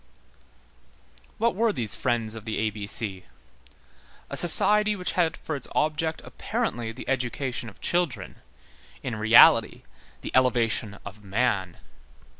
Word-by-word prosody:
What 230 +1 +1
were 225 +3 +1
these 120 - -2
Friends 115 -3 -1
of 110 -1 -9
the 110 - -4
A 110 0 -1
B 100 -1 -7
C? 100 -3 -3 1.1
A - - -3
society 210 +5 +5
which 180 -2 -3
had 165 -3 0
for 155 - -5
its 135 - -6
object 155 +1 -1
apparently 115 -1 -4
the 120 - -10
education 125 -1 -3
of 100 - -20
children, 175 -7 -2 0.7
in 120 - -4
reality 110 +1 +5 0.4
the - - -6
elevation 115 -5 +1
of 100 +1 -11
man. 100 -3 -1
120 Hz, 130 wpm, -25 LUFS, 110-160 Hz, 1.1 s, society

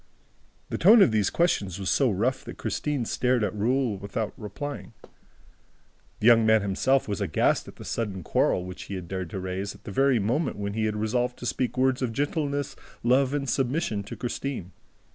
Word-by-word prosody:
The - - -3
tone 210 +4 +8
of 125 - +3
these 105 -3 +2
questions 100 - 0
was 95 -2 -1
so 135 -3 +3
rough 115 +6 0
that - - -8
Christine 145 -5 -2
stared 125 0 +1
at 100 - -1
Raoul 120 +1 +1
without 100 +3 -4
replying. 130 +4 -7 1.3
The - - -3
young 115 -1 +7
man 110 -1 +4
himself 125 +7 +1
was 105 0 -3
aghast 90 -6 +1
at - - -11
the - - -11
sudden 100 -6 -3
quarrel 90 +3 +1
which 90 0 -8
he 100 - -6
had 90 -2 -6
dared 95 -1 -4
to 95 - -5
raise 95 +2 -4
at - - -18
the 105 - -7
very 135 +4 +3
moment 120 +8 0
when 100 0 -3
he 110 0 0
had 105 -1 -1
resolved 120 +4 -1
to - - -8
speak 125 +2 -1
words 130 0 +2
of 120 -3 -1
gentleness, 145 +1 -1 0.3
love 130 +2 +3
and 140 -1 -2
submission 130 -4 0
to - - -7
Christine. 120 -6 -4
115 Hz, 195 wpm, -26 LUFS, 100-135 Hz, 1.3 s, tone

